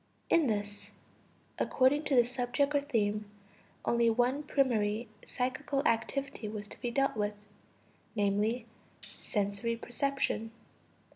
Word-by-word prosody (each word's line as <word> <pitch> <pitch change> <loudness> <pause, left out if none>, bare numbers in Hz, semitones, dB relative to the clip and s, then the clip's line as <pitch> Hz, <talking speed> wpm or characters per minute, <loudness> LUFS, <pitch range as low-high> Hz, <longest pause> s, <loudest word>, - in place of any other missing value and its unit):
In 325 -4 +5
this, 205 -2 -3 0.7
according 280 +4 +3
to 280 - +2
the 245 - +7
subject 250 +3 0
or 285 - +3
theme, 210 -6 0 0.6
only 235 0 +3
one 245 +5 +2
primary 235 -6 +1 0.2
psychical 275 +3 -1
activity 270 +1 -1
was 210 0 -5
to - - -11
be 245 - -1
dealt 275 +2 +1
with: 210 -1 -1 0.8
viz. 210 +3 +1 0.6
sensory 205 +2 -1
perception. 240 -1 -1
240 Hz, 115 wpm, -32 LUFS, 210-275 Hz, 0.8 s, the